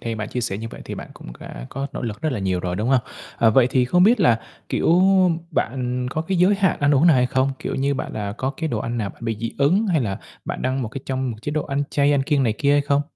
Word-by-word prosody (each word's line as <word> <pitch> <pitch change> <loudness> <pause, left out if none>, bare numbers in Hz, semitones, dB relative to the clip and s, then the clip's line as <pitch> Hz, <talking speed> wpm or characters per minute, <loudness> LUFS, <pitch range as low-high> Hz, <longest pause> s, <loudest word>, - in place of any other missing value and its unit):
theo 115 -1 -4
bạn 110 -1 -4
chia 125 - -3
sẻ 100 -4 -3
như 115 +1 -5
vậy - - -10
thì - - -6
bạn - - -8
cũng - - -11
đã - - -8
có 135 +1 -4
nỗ - - -5
lực 110 -3 -4
rất 155 -3 0
là 120 - -2
nhiều 95 -2 -1
rồi, 90 0 -3
đúng 110 +5 -1
hông? 130 -1 +4 0.4
Ờ, 115 - +4
vậy 120 +2 +5
thì 130 -1 +3
không 180 +8 +3
biết 225 +4 +5
là, 120 -10 +4 0.3
kiểu, 170 +2 +3 0.5
bạn 125 -4 -1
có 155 - -2
cái 185 +2 -1
giới 185 +4 +5
hạn 195 -3 +1
ăn 145 0 +3
uống 145 +5 +4
nào 160 -5 +6
hay 125 0 +3
không? 130 +2 +1
Kiểu - - -4
như, 140 +1 0
bạn, - - -4
à, 100 -2 -3
có 130 - -1
cái 160 - -2
đồ 115 -6 -2
ăn 120 +2 -3
nào 100 -3 -2
bạn - - -13
bị 115 -2 -1
dị 115 - -3
ứng 180 +11 +3
hay 170 -6 +2
là 100 -6 -2 0.3
bạn - - -5
đang 130 - +1
trong 135 - -1
một 115 - -3
cái 135 - -7
trong 130 -1 -2
một 115 - -6
chế 145 - -3
độ 155 0 -1
ăn 140 0 -1
chay, 145 0 +3
ăn 140 -2 +2
kiêng 140 0 +1
này 115 -4 +2
kia 140 - +2
hay 145 - +4
không? 140 0 +1
130 Hz, 310 wpm, -22 LUFS, 115-145 Hz, 0.5 s, nào